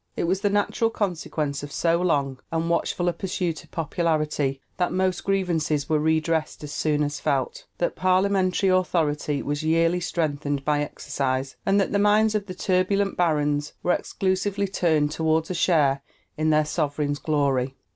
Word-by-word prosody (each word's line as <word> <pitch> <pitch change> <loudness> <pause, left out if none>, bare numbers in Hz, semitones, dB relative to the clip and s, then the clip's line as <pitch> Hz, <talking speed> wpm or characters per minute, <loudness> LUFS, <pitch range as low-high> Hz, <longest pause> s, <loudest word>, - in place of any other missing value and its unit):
It - - 0
was 185 +3 0
the 205 - +2
natural 205 +3 +1
consequence 160 -9 -2
of 145 0 -8
so 170 +2 +1
long 140 -7 0
and 165 +1 -1
watchful 175 +1 0
a 175 - +2
pursuit 175 -2 -3
of - - -21
popularity 155 -4 -1 0.2
that 180 -1 0
most 185 0 0
grievances 165 -7 0
were 155 -1 +2
redressed 160 0 0
as 145 - -6
soon 150 -1 0
as 145 0 -3
felt, - - -1
that - - -1
parliamentary 185 0 +2
authority 155 -6 +1
was 145 0 -2
yearly 165 +2 +2
strengthened 145 -5 -2
by 150 -1 +2
exercise, 135 -2 -2
and 195 +1 +4
that 195 - 0
the 200 - +1
minds 210 +1 +4
of 205 -1 -2
the 185 - -6
turbulent 195 +1 +1
barons 150 -3 +1
were 175 - +3
exclusively 195 +1 -1
turned 160 -6 +1
toward 160 +1 0
a - - 0
share 150 -5 +2 0.3
in 155 +1 0
their 155 0 +3
sovereign's 145 -2 -1
glory. 140 -4 0
165 Hz, 165 wpm, -24 LUFS, 150-185 Hz, 0.3 s, and